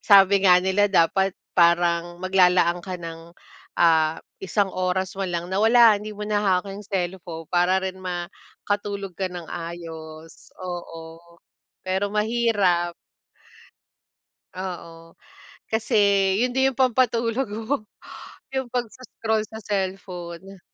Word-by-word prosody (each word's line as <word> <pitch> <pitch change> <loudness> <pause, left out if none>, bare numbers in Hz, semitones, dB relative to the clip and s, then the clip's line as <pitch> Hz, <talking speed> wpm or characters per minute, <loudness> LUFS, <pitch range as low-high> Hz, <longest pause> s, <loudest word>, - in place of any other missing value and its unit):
sabi 200 -1 +6
nga 180 - +8
nila 190 +3 +2
dapat 190 +1 +2 0.2
parang 170 0 +3
maglalaan 180 -1 +3
ka 185 +1 -6
ng 165 -1 -9 0.4
ah 160 -2 +3 0.2
isang 195 0 0
oras 185 0 -1
manlang 175 -2 -3
na 190 - +1
wala 225 0 +6
hindi 215 +1 -7
mo 210 - -5
na 210 0 0
hawak 190 -1 +1
yung 200 - -8
cellphone 175 -3 -4
para 180 +1 +3
rin 190 0 -4
makatulog 195 +2 -5
ka 190 -1 -2
ng 175 -2 -7
maayos 165 -2 -8
oo, 165 -3 -7 0.7
pero 190 +2 -1
mahirap. 210 -6 +1 1.6
Oo, 170 -3 -8 0.6
kasi 220 0 0 0.5
yun 250 - -1
din 265 +1 +3
yung - - -20
pampatulog 240 -1 +2
ko, 220 +2 -3 0.6
yung 265 -2 -2
pag 245 0 -1
sco-scroll 220 -4 -3
sa 220 -1 -10
cellphone. 190 -2 -5
185 Hz, 120 wpm, -24 LUFS, 175-210 Hz, 1.6 s, nga